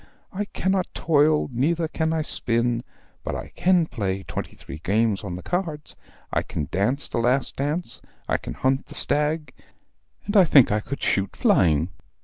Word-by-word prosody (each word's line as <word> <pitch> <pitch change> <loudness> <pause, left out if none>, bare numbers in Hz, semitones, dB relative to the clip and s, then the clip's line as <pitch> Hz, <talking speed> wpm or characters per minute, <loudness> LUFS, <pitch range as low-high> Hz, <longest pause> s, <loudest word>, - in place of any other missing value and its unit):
I 205 +2 -2
cannot 190 -2 -1
toil, 150 -1 +3
neither 160 +7 +1
can 160 0 -1
I 160 -1 0
spin, 120 -3 +1 0.4
but - - -3
I - - -6
can 180 -2 +2
play 95 -9 -3
twenty - - -6
three 70 - -9
games 105 +4 +1
on 95 -3 -4
the 90 - -8
cards. 165 -5 -3 0.4
I - - +2
can 75 - -4
dance 125 +10 0
the - - -2
last 125 +3 +1
dance, 150 +6 -1 0.3
I - - +2
can - - -7
hunt 135 +1 0
the - - -1
stag, 150 +1 +1 0.7
and 205 - -3
I 195 - +8
think 140 -8 +6
I 105 - +2
could 140 +6 -6
shoot 95 0 0
flying. 80 0 +3
140 Hz, 170 wpm, -24 LUFS, 105-160 Hz, 0.7 s, I